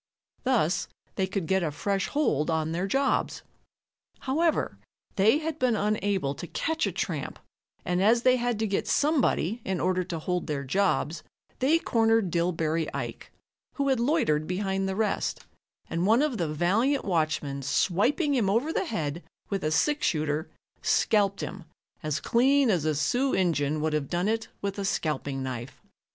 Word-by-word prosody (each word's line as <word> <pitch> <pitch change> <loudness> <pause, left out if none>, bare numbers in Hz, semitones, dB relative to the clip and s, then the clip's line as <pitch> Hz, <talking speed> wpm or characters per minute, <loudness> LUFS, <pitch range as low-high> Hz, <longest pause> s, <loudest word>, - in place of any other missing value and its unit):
Thus 185 -9 +2 0.3
they 190 - 0
could 190 -2 -2
get 190 +3 +2
a 165 - 0
fresh 195 +6 -1
hold 155 - 0
on 160 -1 0
their 175 +4 -1
jobs. 270 +7 0 0.8
However, 315 +5 0 0.4
they 220 +6 +4
had 315 0 -4
been 250 -3 +2
unable 205 -8 0
to 175 - -8
catch 320 - -1
a - - -2
tramp, - - -3 0.5
and 180 0 0
as 230 +4 +4
they 255 0 +5
had 240 -2 -1
to 220 - 0
get 200 -2 -1
somebody 265 - +1
in 190 -1 -2
order 185 0 +1
to 170 - -4
hold 180 +2 -2
their 145 -3 -2
jobs, 165 0 0 0.4
they 285 +6 +4
cornered 225 - +2
Dillbery 165 -2 0
Ike, - - -5 0.4
who 280 -1 0
had 265 -3 +2
loitered 235 - +1
behind 195 +1 -1
the 190 - -2
rest, 215 -1 -1 0.5
and 170 +3 -1
one 230 +6 +5
of 270 -8 -1
the 165 -3 -1
valiant 210 - +1
watchmen 155 -6 -1
swiping 205 - +1
him 230 -8 +2
over 245 +11 +1
the - - 0
head 165 - -3 0.3
with 195 -1 -1
a 155 - +1
six 295 - +2
shooter, 155 0 -1 0.3
scalped 200 -2 +2
him 190 -1 -6 0.4
as 155 -1 -1
clean 265 +3 +3
as 170 -6 0
a 155 -1 +1
Sioux 250 - +1
Injun 155 -5 +1
would 155 0 0
have 150 -2 -1
done 175 +2 0
it 225 +1 -1 0.2
with 200 0 -2
a - - -2
scalping 145 -7 -2
knife. 125 -1 -6
195 Hz, 170 wpm, -27 LUFS, 160-240 Hz, 0.8 s, they